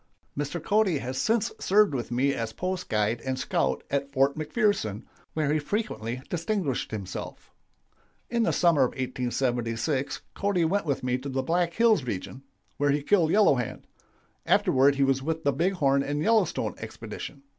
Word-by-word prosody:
"Mr. 145 +4 -3
Cody 200 0 +2
has 130 -1 -4
since 220 - +1
served 205 -3 +4
with 120 -4 -3
me 130 +4 +1
as 115 -3 -3
post 185 +5 -3
guide 110 +2 0
and 130 +1 -2
scout - - 0
at 140 0 -1
Fort 135 0 +2
McPherson, 155 - 0 0.3
where 150 -2 +1
he 155 - +2
frequently 130 - -3
distinguished 175 - -2
himself. 100 -4 -7 0.8
"In 235 0 0
the - - +2
summer 170 -5 +3
of 130 - +2
1876 125 +1 -1
Cody 200 -4 +1
went 190 +1 0
with 140 -3 -1
me 125 0 0
to 140 +2 -6
the 130 0 -1
Black 170 0 +1
Hills 225 - +4
region, 125 +3 -5 0.4
where 145 0 +2
he 145 +1 +1
killed 175 -2 +3
Yellow 205 -2 +5
Hand. 125 -3 -4 0.6
Afterward 135 +2 +4
he 140 - +2
was 135 -1 +2
with 160 +3 -3
the 140 - +2
Big 175 +8 +1
Horn 140 -6 +2
and 145 +1 -2
Yellowstone 220 -5 +2
expedition. 140 - -8
140 Hz, 165 wpm, -27 LUFS, 130-180 Hz, 0.8 s, Yellow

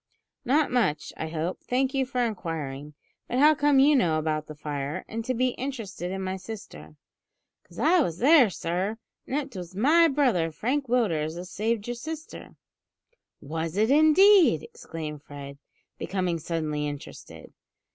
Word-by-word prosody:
"Not 290 +4 +2
much, 230 -12 0
I - - -4
hope; 160 +3 -3
thank 260 +1 0
you 270 -2 0
for 250 -2 0
inquiring; 150 -8 -5 0.3
but 245 - -2
how 300 +3 +6
come 290 -1 +2
you 280 +3 +6
to 275 - +5
know 165 -8 +2
about 155 -1 -2
the 155 - -9
fire, 145 -1 -4
and 225 +1 -4
to 255 - -1
be 255 +2 +2
interested 230 -9 -5
in 190 +1 -4
my 190 0 -3
sister?" 130 - -10 0.7
"'Cause 170 - -18
I 345 +4 +4
was 175 - 0
there, 270 - +6
sir; 185 +5 -3 0.3
an' 265 - -3
it 280 -5 -3
was 180 -1 -8
my 310 - +5
brother, 260 - +2
sir, 160 - -9
Frank 270 +4 -1
Willders, 170 -10 0
as 180 +1 -8
saved 220 +1 -1
your 240 - -2
sister." 315 +6 -8 0.9
"Was 160 +4 -4
it, 220 +4 +3
indeed!" 315 - +6
exclaimed 155 -3 -8
Fred, 140 -1 -10 0.4
becoming 180 -3 -2
suddenly 150 -2 -2
interested. 145 -1 -9
200 Hz, 165 wpm, -26 LUFS, 160-265 Hz, 0.9 s, how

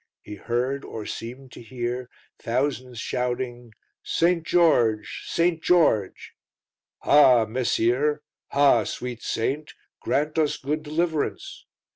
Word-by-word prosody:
He - - -9
heard, 125 +6 -2
or 110 -2 -7
seemed 125 +3 -7
to - - -11
hear, 120 +1 -4 0.3
thousands 125 -1 -2
shouting: 120 -1 -3 0.3
"St. 170 0 +1
George! 120 -12 +2
St. 170 -1 +1
George!" 155 - +2 0.7
"Ha! 130 -6 +6
messire; 130 +5 0 0.2
ha! 140 -5 +4
sweet 125 -2 -5
Saint, 145 +7 -3 0.3
grant 150 +2 0
us 150 -2 +1
good 150 +3 -3
deliverance!" 165 - -3
130 Hz, 105 wpm, -24 LUFS, 120-150 Hz, 0.7 s, Ha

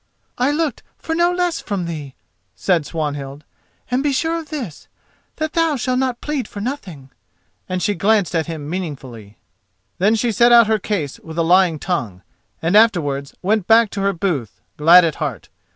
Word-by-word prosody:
"I 255 +3 +3
looked 300 0 -1 0.2
for 325 - -4
no 345 +2 +3
less 355 -1 0
from 195 -4 -3
thee," 150 -5 -6 0.4
said 170 -6 0
Swanhild, 145 -3 -4 0.5
"and 250 +2 +1
be 290 0 +1
sure 325 +5 0
of 315 -3 -10
this, 250 - -6 0.5
that 315 0 -3
thou 330 -2 +2
shalt 255 0 -1
not 255 -2 -1
plead 295 -4 -3
for 205 - -9
nothing," 190 - -6 0.6
and 185 -1 -2
she 205 - +1
glanced 200 -1 +1
at 165 -1 0
him 155 -3 -6
meaningly. 135 - -6 0.6
Then 205 +5 +3
she 230 +2 0
set 235 +3 +4
out 235 -1 +8
her 220 0 +1
case 180 -9 -3
with 160 0 -10
a 165 - +2
lying 175 -1 +4
tongue, 120 - -3 0.4
and 170 +4 +1
afterwards 155 -11 +2
went 205 0 +1
back 225 -1 +5
to 200 - -4
her 200 0 +2
booth, 165 - -3 0.2
glad 170 +4 +7
at 160 - -2
heart. 130 - -4
190 Hz, 180 wpm, -19 LUFS, 155-240 Hz, 0.6 s, out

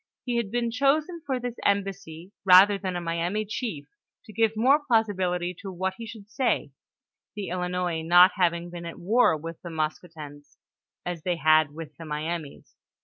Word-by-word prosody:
He 245 -2 -1
had 235 -4 -1
been 235 +1 -1
chosen 300 +7 +1
for 260 -2 -1
this 245 -1 -4
embassy 195 -3 -2
rather 195 +2 +7
than 185 -2 -3
a - - -1
Miami 170 +5 -2
chief, 205 - -4 0.4
to 215 - -13
give 225 -1 +1
more 270 +7 +4
plausibility 190 -8 0
to 195 -3 -6
what 190 +1 -2
he 230 - -7
should 210 -2 -11
say, 250 +4 -1 0.6
the 205 -2 -5
Ilinois 180 -2 -2
not 175 +3 +7
having 175 -2 0
been 170 -1 -7
at 170 - -8
war 205 -2 +3
with 165 +2 -8
the 175 - -8
Maskoutens, 155 -2 -6 0.5
as 175 -2 -4
they 175 +2 -1
had 155 -2 +3
with 155 -2 -9
the 165 - -9
Mi 150 0 -4
amis. 165 -4 -6
180 Hz, 175 wpm, -26 LUFS, 165-220 Hz, 0.6 s, rather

